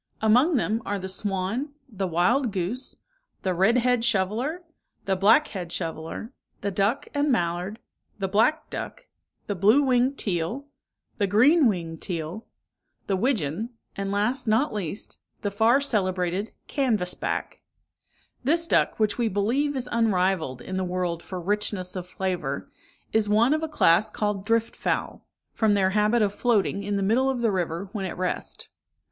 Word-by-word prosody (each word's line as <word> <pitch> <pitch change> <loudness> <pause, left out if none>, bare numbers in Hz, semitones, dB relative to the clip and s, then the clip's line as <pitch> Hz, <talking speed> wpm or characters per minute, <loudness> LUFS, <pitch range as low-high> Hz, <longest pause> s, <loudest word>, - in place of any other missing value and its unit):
Among 250 +10 +4
them 225 -2 0
are 205 - -2
the 190 -1 -5
swan, 200 +8 -2
the 200 -6 -3
wild 210 +9 +2
goose, 200 +8 -3 0.5
the 185 - +1
red 195 +7 +3
head 245 -1 +2
shoveler, 240 - 0 0.4
the 195 - +1
black 220 +11 +5
head 180 -4 -6
shoveler, 165 - -5 0.3
the 200 - -1
duck 205 +8 0
and 290 0 +1
mallard, 180 -1 -1 0.4
the 195 -2 -1
black 225 +11 +2
duck, - - -6 0.4
the 205 - -2
blue 210 +9 +4
winged 260 +1 +2
teal, 190 +8 -2 0.5
the 200 - +2
green 260 - +5
winged 165 -6 -2
teal, 175 +3 -5 0.6
the 195 - 0
widgeon, 215 - -1 0.2
and, 195 0 -3
last 230 +5 0
not 220 +6 +2
least, 200 -1 -5 0.2
the 205 - -1
far 225 +6 +4
celebrated 190 -5 0 0.2
canvass 220 -10 0
back. - - -4 0.8
This 330 +6 +3
duck, - - +2
which 215 +1 +1
we 235 - +2
believe 240 +9 0
is 255 -2 -2
unrivalled 185 - +1
in 185 - -4
the 190 - 0
world 180 -2 -2
for 185 0 -6
richness 195 -1 -2
of 180 -1 -5
flavour, 185 -1 -3 0.4
is 220 -2 +2
one 230 +6 +4
of 310 - 0
a 320 - -3
class 215 - +4
called 205 -2 -2
drift 230 0 +1
fowl, - - -2 0.3
from 215 -2 +2
their 190 -1 +2
habit 215 +3 +3
of 200 -1 0
floating 205 -4 +1
in 205 0 -2
the 200 - 0
middle 245 +7 +3
of 260 -3 -1
the 230 -2 +2
river 175 0 -2
when 205 -3 -3
at 185 - -5
rest. 180 0 -3
205 Hz, 160 wpm, -25 LUFS, 185-240 Hz, 0.8 s, black